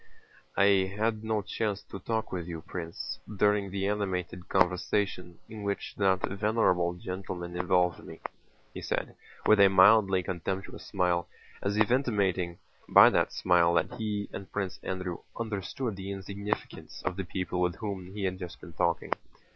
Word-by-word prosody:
"I 95 -1 +4
had 110 0 0
no 110 -2 0
chance 105 0 -2
to 100 - -8
talk 110 +1 -2
with 90 -2 -3
you, 85 -2 -5
Prince, 85 0 -6 0.2
during 105 -1 +3
the 95 +1 -2
animated 90 -3 -2
conversation 90 0 +1
in 110 -1 -8
which 100 0 -3
that 95 -2 +2
venerable 100 -4 +2
gentleman 90 -1 -5
involved 90 0 +2
me," - - -10 0.5
he - - -6
said - - -2 0.3
with 110 -1 +6
a 100 - +9
mildly 95 -1 +6
contemptuous 95 +3 -4
smile, 90 -3 +1 0.3
as 100 +1 -1
if 110 +2 +3
intimating 100 -9 +1 0.3
by - - +9
that - - +2
smile 85 -1 +3
that - - +1
he 105 -2 -2
and 95 - -7
Prince 95 -3 -3
Andrew 90 -2 -3 0.2
understood 110 +1 -3
the 95 +1 -6
insignificance 100 +1 -5
of 90 -1 -1
the 95 - -3
people 90 0 -2
with 90 -1 +1
whom 100 -4 -5
he 105 - -3
had 95 -1 -1
just 90 -2 -7
been - - -11
talking. - - +1
95 Hz, 155 wpm, -29 LUFS, 90-105 Hz, 0.5 s, a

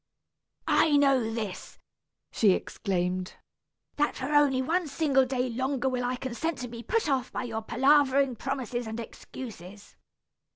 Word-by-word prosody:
"I 300 -3 +4
know 270 -5 +3
this," 215 -5 -5 0.5
she 205 -4 +4
exclaimed, 185 -2 -2 0.6
"that 295 0 +1
for 265 +3 -3
only 290 -3 +4
one 330 +6 0
single 275 -3 +2
day 255 -1 -1
longer 260 +2 -1
will 250 -1 -1
I 250 +1 -1
consent 260 +5 -3
to 250 - -4
be 235 0 -8
put 450 - 0
off 265 -3 0
by - - -3
your 225 -2 -4
palavering 270 +2 +3
promises 245 -1 -3
and 220 +1 -5
excuses. 205 -4 -10
255 Hz, 140 wpm, -28 LUFS, 230-275 Hz, 0.6 s, I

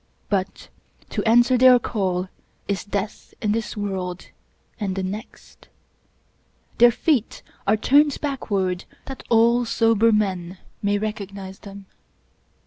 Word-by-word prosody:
But 195 -2 -2 0.4
to - - -2
answer 240 +2 +4
their 255 0 +8
call 190 -6 -2 0.4
is 200 -2 -2
death 205 0 -5
in 210 - 0
this 220 0 -3
world 185 -3 -4 0.5
and 195 -3 -2
the 190 - -2
next. 205 +5 -8 1.1
Their 240 +1 +8
feet 240 0 -1 0.2
are 210 +2 +4
turned 285 +6 +3
backward 200 -10 -2 0.2
that 270 -1 -8
all 235 +1 +4
sober 230 -1 +3
men 190 -4 -1 0.2
may 205 0 +1
recognize 200 -2 -6
them. 200 -1 -11
210 Hz, 120 wpm, -23 LUFS, 195-235 Hz, 1.1 s, their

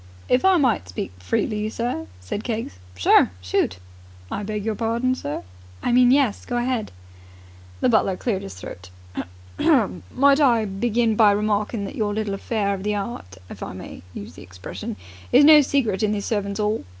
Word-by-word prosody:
"If 250 - +3
I 380 -1 +5
might 245 - +1
speak 90 0 -4
freely, 210 - -1
sir.. 230 -8 -3
.?" 90 - -22
said 90 - -5
Keggs. 220 - -4 0.2
"Sure. 90 - +5
Shoot!" 90 -1 0 0.5
"I - - -2
beg 210 0 -4
your 220 - 0
pardon, 230 +4 0
sir?" 145 - -4 0.4
"I - - +1
mean, 245 0 +6
yes. 260 -5 +3
Go 245 - -3
ahead!" 240 -2 -1 0.9
The - - +3
butler 195 -5 +2
cleared 205 -4 -1
his 95 - -8
throat. 90 0 -9 0.7
"Might 255 - +3
I 235 -6 +4
begin 225 +3 0
by 215 -1 +6
remarking 210 +1 0
that - - -6
your 210 -5 -1
little 215 -2 -2
affair 200 0 -1
of 195 - -5
the 210 +1 -1
'eart, 195 - -5
if - - -11
I - - -5
may - - -9
use 100 - -8
the - - -12
expression, 90 0 -7 0.4
is 285 - +7
no 305 0 +9
secret 255 -8 0
in 210 -1 +2
the 205 - -2
Servants' 200 -1 -2
'All? 210 +1 0
210 Hz, 180 wpm, -23 LUFS, 190-240 Hz, 0.9 s, no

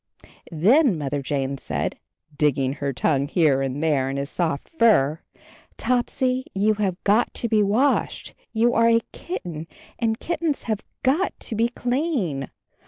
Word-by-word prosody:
Then 215 - +4
Mother 145 -1 -2
Jane 135 0 -2
said, - - -3 0.4
digging 140 -3 +1
her 140 -1 -2
tongue 140 +1 +1
here 150 -4 +3
and 135 +2 -2
there 140 -4 +2
in 135 - -3
his 140 +2 -3
soft 160 -5 -1
fur, 175 - +3 0.6
"Topsy, 255 +1 0
you 210 +3 +3
have 200 -4 -1
got 210 +4 +3
to 235 - -1
be 215 -2 +3
washed. 220 +8 +1 0.2
You 235 +2 +2
are 230 0 +4
a 230 0 +4
kitten, 170 - -6 0.3
and 225 -1 0
kittens 325 -3 -2
have 220 -2 -2 0.2
got 300 +9 +1
to 225 - -5
be 230 +2 +2
clean. 245 - -1
200 Hz, 150 wpm, -23 LUFS, 145-240 Hz, 0.6 s, Then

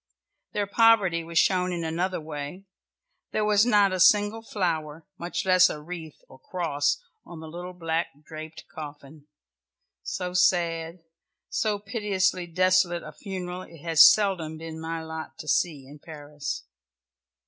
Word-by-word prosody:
Their 205 -1 0
poverty 200 -5 +4
was 165 0 -5
shown 180 +1 +3
in 170 -1 -3
another 175 +3 -1
way; 155 +4 -7 0.7
there 215 - +1
was 210 +2 +4
not 205 -4 +4
a 185 - -2
single 205 +4 +4
flower, 165 -7 -3
much 175 +2 -3
less 185 -1 +6
a 150 - -5
wreath 160 -1 -8
or 130 - -16
cross 145 -4 -1 0.2
on 170 -1 -11
the 160 - -9
little 175 +3 -7
black 165 -1 -1 0.2
draped 155 0 -9
coffin 145 -1 -10 0.7
so 180 - -4
sad, 170 -2 +1 0.5
so 215 -2 0
piteously 200 -4 -1
desolate 185 0 +2
a - - -8
funeral 185 -2 -6
it 165 -4 -13
has 165 -1 +8
seldom 185 -7 0
been 160 0 -8
my 165 0 -4
lot 160 0 -7
to 155 - -9
see 150 -4 0
in 145 +3 -13
Paris. 145 - -6
170 Hz, 145 wpm, -26 LUFS, 160-185 Hz, 0.7 s, has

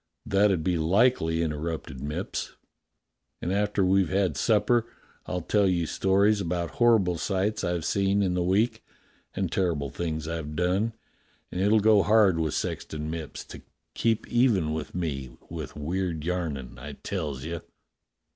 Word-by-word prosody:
"That 100 +1 +3
'ud 90 -5 0
be 90 -1 +1
likely," 85 -2 +3
interrupted 75 -3 -4
Mipps. 75 +2 -4 0.9
"And, 90 - -2
after 105 -1 +1
we've 95 -1 +3
had 95 -5 +1
supper, 115 - +2 0.4
I'll 90 0 -2
tell 100 +2 +3
you 85 -3 +1
stories 100 +5 +2
about 85 -2 -2
horrible 105 -8 +3
sights 100 +3 -1
I've 85 -2 -1
seen 100 0 +2
in 90 -2 +1
the 90 - 0
week, 110 +6 +1 0.5
and 95 -3 -1
terrible 80 -8 0
things 80 -1 -3
I've 80 -2 -4
done, 95 +7 +1 0.6
and 90 - -2
it'll 105 +2 +4
go 105 -1 +6
hard 105 -5 +4
with 80 -3 0
Sexton 75 0 -3
Mipps 80 -2 -6
to - - -9 0.3
keep 115 -1 0
even 110 -11 +2
with 80 +1 -5
me 70 -8 -3
with 80 -6 -6
weird 85 +1 -2
yarnin', 75 -9 -3
I 70 +2 -7
tells 75 -5 -4
you." 85 +1 -4
90 Hz, 150 wpm, -27 LUFS, 80-100 Hz, 0.9 s, go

